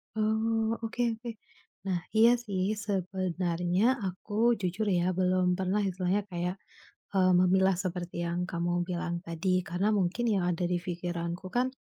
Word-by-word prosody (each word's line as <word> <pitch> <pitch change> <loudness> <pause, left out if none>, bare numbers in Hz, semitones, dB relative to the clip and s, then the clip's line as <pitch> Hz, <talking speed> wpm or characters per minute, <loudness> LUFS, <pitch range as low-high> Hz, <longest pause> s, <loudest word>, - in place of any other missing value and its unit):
Oh, 220 +1 +1
oke 225 +2 -3 0.2
oke. 235 +1 -7 0.6
Nah, 180 -2 +1 0.2
iya 225 +2 +8 0.2
sih. 195 -4 -2 0.2
Sebenarnya 185 +2 0
aku, 210 +5 +1
jujur 185 +4 -1
ya, 180 -3 +2
belum 185 -1 +2
pernah 190 +2 0
istilahnya 190 0 0
kayak, 180 0 -2 0.6
eee, 185 -2 +4
memilah 190 +1 +4
seperti 175 -1 -3
yang 175 +1 -2
kamu 175 0 -1
bilang 175 -1 -2
tadi 180 +2 0
karena 190 +5 +1
mungkin 200 +3 0
yang 185 -3 +1
ada 175 0 0
di 175 0 0
pikiranku 175 0 -4
kan 250 +1 +2
185 Hz, 140 wpm, -29 LUFS, 175-205 Hz, 0.6 s, iya